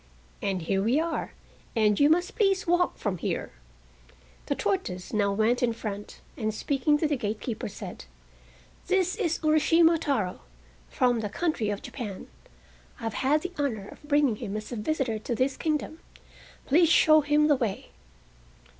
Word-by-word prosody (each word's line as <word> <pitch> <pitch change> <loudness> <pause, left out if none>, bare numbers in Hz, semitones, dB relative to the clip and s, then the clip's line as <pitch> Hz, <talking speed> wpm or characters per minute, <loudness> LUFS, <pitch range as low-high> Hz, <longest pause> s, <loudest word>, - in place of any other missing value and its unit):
"And 190 -3 -1
here 195 +4 0
we 235 +8 +2
are, 325 -1 -2 0.4
and 210 -2 +3
you 285 - +6
must 355 +6 +2
please 390 -3 +2
walk 350 +1 +2
from 195 -5 -3
here." - - -3 1.0
The - - 0
tortoise 185 -2 -2
now 205 -2 +2
went 220 +4 +1
in 240 -2 +2
front, 205 -2 -7
and 215 -1 -1
speaking 280 +6 +1
to 310 - +1
the 295 - 0
gatekeeper, 220 0 -3
said: 195 - -8 0.8
"This 370 -1 +2
is 335 -1 0
Urashima 325 +2 +4
Taro, 225 - -1 0.5
from 245 -2 +2
the 210 -2 -3
country 275 - -1
of 205 0 -4
Japan. 210 -8 -6 0.7
I - - -11
have 225 -2 -2
had 290 +4 +1
the 365 0 -5
honor 225 -9 -2
of - - -13
bringing 290 -6 +2
him 205 +1 -4
as 215 +3 -7
a - - -3
visitor 240 -1 -1
to 235 +2 -3
this 260 +4 0
kingdom. 310 0 -2 0.7
Please 325 +4 +4
show 310 -2 +6
him 295 +1 +3
the 295 - +5
way." 230 -7 -3
255 Hz, 165 wpm, -27 LUFS, 210-310 Hz, 1.0 s, you